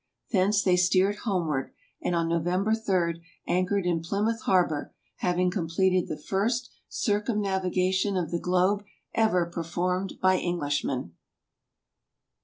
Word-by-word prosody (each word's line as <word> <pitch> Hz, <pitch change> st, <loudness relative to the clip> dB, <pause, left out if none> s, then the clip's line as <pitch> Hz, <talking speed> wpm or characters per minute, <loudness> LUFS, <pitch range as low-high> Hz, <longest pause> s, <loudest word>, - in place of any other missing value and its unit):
Thence 200 Hz, 0 st, +3 dB
they 180 Hz, -2 st, +3 dB
steered 185 Hz, +3 st, +3 dB
homeward, 170 Hz, -, -1 dB, 0.3 s
and 175 Hz, -, 0 dB
on 165 Hz, -1 st, +1 dB
November 175 Hz, +5 st, +1 dB
3, 180 Hz, -6 st, 0 dB, 0.2 s
anchored 185 Hz, +2 st, +1 dB
in 170 Hz, -2 st, +1 dB
Plymouth 210 Hz, +6 st, -1 dB
harbor, 175 Hz, -6 st, +1 dB, 0.2 s
having 180 Hz, 0 st, +1 dB
completed 180 Hz, +1 st, +1 dB
the 155 Hz, -, -4 dB
first 225 Hz, +10 st, -1 dB, 0.2 s
circumnavigation 195 Hz, -3 st, 0 dB
of 170 Hz, -4 st, -2 dB
the 170 Hz, -, 0 dB
globe 185 Hz, +4 st, +2 dB, 0.3 s
ever 200 Hz, -6 st, +3 dB
performed 175 Hz, +3 st, -2 dB
by 185 Hz, -1 st, +3 dB
Englishmen. 145 Hz, -, -2 dB
185 Hz, 115 wpm, -27 LUFS, 170-200 Hz, 0.3 s, Thence